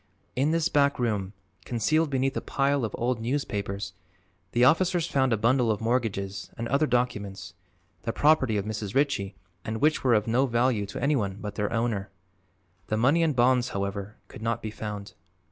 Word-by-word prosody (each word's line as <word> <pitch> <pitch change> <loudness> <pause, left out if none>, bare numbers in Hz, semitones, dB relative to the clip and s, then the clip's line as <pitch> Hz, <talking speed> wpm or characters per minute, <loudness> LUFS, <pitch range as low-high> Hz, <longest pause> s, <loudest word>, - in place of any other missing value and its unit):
In 135 +4 +2
this 165 0 +2
back 145 -3 +2
room, 105 -5 -1 0.3
concealed 155 +7 +1
beneath 135 0 0
a - - -1
pile 140 -1 0
of 110 - -2
old 120 -1 -1
newspapers, 105 -6 -3 0.6
the 120 - +2
officers 170 +5 +4
found 135 -5 +1
a 115 - +3
bundle 120 +2 +2
of 105 -2 +1
mortgages 105 -5 -1
and 115 0 -3
other 140 +3 +2
documents, 100 -7 -2 0.5
the 115 - -2
property 135 -6 +3
of 100 - -2
Mrs. 105 -1 -4
Ritchie 135 -9 +1 0.3
and 110 0 -3
which 155 +4 +2
were 125 -3 +4
of 105 -1 +2
no 125 +4 +2
value 120 -3 +1
to 100 - -6
anyone 115 -10 +1
but 105 -1 -5
their 105 0 -2
owner. 115 -4 -1 0.8
The 110 - 0
money 135 +9 +3
and 160 -4 +2
bonds, 125 0 +3
however, 100 0 -4
could - - -12
not 115 +1 -1
be 110 - -4
found. 105 -2 -6
115 Hz, 180 wpm, -27 LUFS, 105-135 Hz, 0.8 s, officers